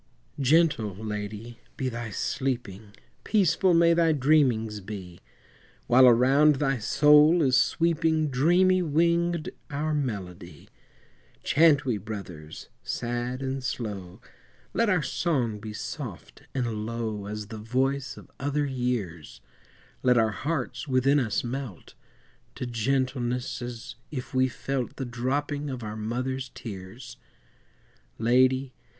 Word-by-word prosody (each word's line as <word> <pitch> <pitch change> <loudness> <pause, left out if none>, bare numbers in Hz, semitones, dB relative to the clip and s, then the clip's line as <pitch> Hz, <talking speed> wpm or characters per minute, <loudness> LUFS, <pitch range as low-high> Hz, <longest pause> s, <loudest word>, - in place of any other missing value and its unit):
Gentle, 140 - +3
Lady, 105 +2 -6 0.2
be 130 - -1
thy 120 -2 -4
sleeping, 110 -2 -3 0.3
Peaceful 190 -3 +3
may 170 0 +5
thy 165 -1 +3
dreamings 125 -7 +2
be, 95 -3 -8 0.7
While 125 +1 +6
around 135 +5 +5
thy 135 -2 0
soul 150 +7 +5
is 130 -2 +3
sweeping, 160 -1 +2
Dreamy 180 +7 +4
winged, 170 +1 +1 0.2
our 150 +2 -2
melody; 95 -11 -5 0.7
Chant 150 -2 +4
we, 120 -5 0
Brothers, 95 -7 -8
sad 120 +2 -3
and 135 0 -3
slow, 100 -8 -5 0.5
Let 230 -1 +2
our 180 -6 +2
song 125 - -1
be 105 +1 -7
soft 105 - -7
and 115 -5 -2
low 110 -3 -4
As 105 0 -6
the 110 - -7
voice 130 +4 -1
of - - -14
other 145 +1 0
years, 120 - -3 0.6
Let 125 -1 +4
our 110 -1 +3
hearts 155 +5 -3
within 135 +2 +3
us 115 -6 -1
melt, 125 -6 -6 0.6
To - - -4
gentleness, 125 +1 -1
as 120 -1 -7 0.2
if 130 -5 -6
we 130 0 +3
felt 130 0 -4
The 135 - -4
dropping 140 +4 -2
of 130 -3 -5
our 105 0 -5
mother's 125 +4 -3
tears. 115 +3 -9 1.0
Lady! 130 +3 +2
125 Hz, 120 wpm, -27 LUFS, 110-145 Hz, 1.0 s, While